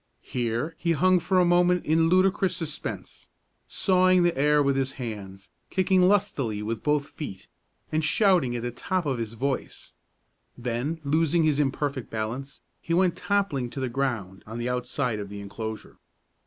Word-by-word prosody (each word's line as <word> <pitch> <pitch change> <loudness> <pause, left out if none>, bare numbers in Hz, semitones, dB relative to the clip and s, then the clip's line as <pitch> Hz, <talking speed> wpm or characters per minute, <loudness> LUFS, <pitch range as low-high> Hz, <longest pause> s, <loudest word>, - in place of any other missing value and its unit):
Here 120 +6 -2
he 170 -1 +1
hung 185 +4 +4
for 185 +2 0
a 180 - +5
moment 175 0 +3
in 160 +1 +3
ludicrous 185 +1 +3
suspense, 155 -3 -6 0.4
sawing 185 -1 +3
the 175 -1 +2
air 150 +2 +3
with 140 -1 +2
his 135 0 -1
hands, 100 -5 -7 0.2
kicking 185 0 +2
lustily 180 - +1
with 110 +1 -3
both 150 -1 0
feet, 100 - -7 0.4
and 155 0 0
shouting 175 - +3
at 120 - -3
the 120 - -2
top 180 +8 -2
of 135 -4 -1
his 115 -1 -4
voice; 135 +3 -4 0.7
then, 125 +6 -2
losing 160 +3 +2
his 150 -2 +2
imperfect 140 -2 -1
balance, 115 +5 -4 0.2
he 165 - -1
went 180 -1 +3
toppling 195 -12 0
to 135 - -6
the 130 -1 -1
ground 115 -8 -2
on 115 +2 -6
the 120 +1 -2
outside 125 -1 -1
of 100 -1 -6
the 100 0 -7
enclosure. 110 +2 -7
140 Hz, 165 wpm, -26 LUFS, 120-175 Hz, 0.7 s, a